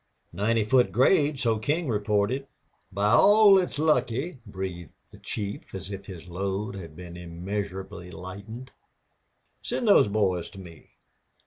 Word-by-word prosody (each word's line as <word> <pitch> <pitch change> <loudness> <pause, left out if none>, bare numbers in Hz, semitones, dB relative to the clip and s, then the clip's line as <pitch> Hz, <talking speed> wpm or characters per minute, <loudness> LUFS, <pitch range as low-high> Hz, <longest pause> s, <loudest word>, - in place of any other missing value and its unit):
"Ninety 110 +5 +1
foot 125 +2 +3
grade, 145 +1 +3
so 115 -4 +1
King 150 +8 -1
reported." 105 +4 0 0.4
"By 100 +2 +1
all 205 - +7
that's 185 -6 +2
lucky!" 140 0 0
breathed 95 -5 -6 0.2
the - - -15
chief, 100 -2 -6
as 95 +1 -7
if 100 0 -7
his 90 -4 -9
load 100 +3 -3
had 85 -6 -9
been 85 0 -9
immeasurably 90 +1 -6
lightened. 100 +8 -9 0.9
"Send 240 - -2
those 200 - +6
boys 95 -4 0
to 95 - -12
me." 85 -4 -13
105 Hz, 135 wpm, -26 LUFS, 95-130 Hz, 0.9 s, all